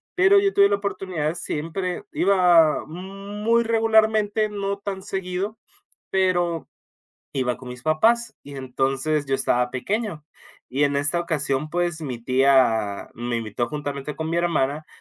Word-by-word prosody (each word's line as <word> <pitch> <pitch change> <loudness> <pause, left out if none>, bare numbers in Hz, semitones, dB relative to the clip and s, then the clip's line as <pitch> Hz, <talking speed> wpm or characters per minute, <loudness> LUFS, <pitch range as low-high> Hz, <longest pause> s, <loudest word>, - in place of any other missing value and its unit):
pero 385 +1 +6
yo 395 0 +1
tuve 200 0 +5
la 200 - +2
oportunidad 185 -6 -3
siempre, 175 +4 -3
iba 175 -5 +4
muy 200 +7 -2
regularmente, 220 -1 +2
no 200 -1 -3
tan 195 -1 -5
seguido, 195 +2 -3 0.5
pero 175 -3 0 0.7
iba 125 -2 0
con 125 -1 -10
mis 125 0 -9
papás, 230 +10 +2
y 140 -1 -10
entonces 135 +3 -1
yo 135 - 0
estaba 125 -1 +1
pequeño, 170 - -3 0.5
y 140 +3 +2
en 140 0 +1
esa 145 +5 +2
ocasión, 150 -3 0
pues 175 -2 -1
mi 130 -6 -5
tía 125 -6 +2
me 120 +1 -3
invitó 115 +1 -3
juntamente 145 -1 -5
con 160 0 -3
mi 170 - +1
hermana 155 -3 0
165 Hz, 140 wpm, -23 LUFS, 135-200 Hz, 0.7 s, pero